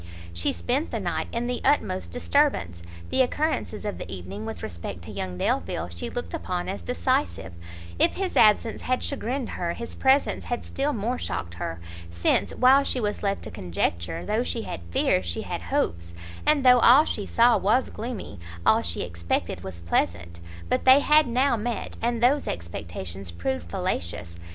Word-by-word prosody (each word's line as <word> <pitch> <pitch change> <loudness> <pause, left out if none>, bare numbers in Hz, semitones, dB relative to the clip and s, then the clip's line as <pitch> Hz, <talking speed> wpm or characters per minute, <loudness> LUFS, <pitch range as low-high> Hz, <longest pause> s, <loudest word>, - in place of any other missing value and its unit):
She 85 0 +1
spent 85 0 -1
the - - -3
night - - -2
in 235 +1 -2
the 245 0 -2
utmost 225 -10 +1
disturbance; 245 - +1 0.3
the 265 - +3
occurrences 260 -4 -1
of 205 - -3
the - - -7
evening 95 +3 -6
with 110 - -6
respect 85 0 -6
to 105 - -8
young 95 -3 -4
Delvile 90 - -1
she 85 0 -6
looked 245 - -5
upon 180 -1 -3
as 100 - -4
decisive; 85 +1 -1 0.5
if - - +4
his 380 -1 -2
absence 220 +1 +4
had 255 0 -1
chagrined 260 -2 -2
her, 170 -1 -2
his 235 +4 -6
presence 270 +1 +2
had 240 - -3
still 280 +2 -1
more 240 +1 -2
shocked 85 - -4
her, 85 -1 -5 0.3
since, 85 0 +1
while 265 +3 +6
she 260 - -1
was 210 -3 -2
left 200 -1 -1
to - - -7
conjecture, 85 -1 -2
though 215 +2 +1
she 235 -2 -2
had - - -6
fears 90 +2 +2
she 85 -1 -3
had - - -4
hopes, 85 0 -2 0.3
and 295 -3 +4
though 250 -1 +8
all 255 +6 +7
she 205 - -3
saw 235 +1 +5
was 230 +6 +2
gloomy, 220 - -6 0.3
all - - +5
she 85 0 -2
expected 85 0 -2
was 95 -3 -7
pleasant; 85 0 -1 0.3
but - - 0
they 260 +2 +7
had 300 0 +5
now 250 +2 +2
met, 230 +1 -3
and 235 0 0
those 280 +4 +3
expectations 85 +2 -5
proved 85 0 -3
fallacious. 85 0 -3
185 Hz, 175 wpm, -26 LUFS, -, 0.5 s, though